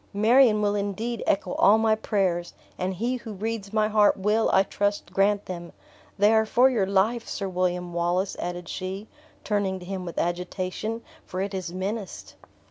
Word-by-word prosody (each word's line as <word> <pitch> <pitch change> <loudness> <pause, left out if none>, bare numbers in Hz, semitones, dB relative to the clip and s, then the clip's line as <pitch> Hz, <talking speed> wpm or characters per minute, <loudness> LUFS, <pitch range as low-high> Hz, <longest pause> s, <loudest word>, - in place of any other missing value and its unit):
"Marion 220 0 +5
will 205 0 +2
indeed 205 +3 -2
echo 195 -2 +1
all 210 +2 +6
my 220 0 +3
prayers, 190 -5 -1 0.2
and 185 +1 -2
He 240 +7 -1
who 230 -2 -8
reads 210 0 -4
my 215 -1 +2
heart 210 -1 +4
will, 210 +3 +2
I 190 - +5
trust, 205 -2 -2
grant 200 +1 +2
them. 175 -2 -7 0.4
They 205 +2 +5
are 220 0 +3
for 255 +4 +4
your 210 -6 +1
life, 210 +5 +1
Sir 195 - -3
William 180 -1 -1
Wallace," 175 +3 0
added 175 0 -4
she, 190 +4 -5 0.4
turning 200 -3 0
to 180 - -10
him 190 0 -4
with 170 -2 -7
agitation, 185 +6 -3 0.2
"for 185 - -6
it 195 +1 -2
is 185 -3 -4
menaced." 195 +2 -5
200 Hz, 175 wpm, -26 LUFS, 185-215 Hz, 0.4 s, all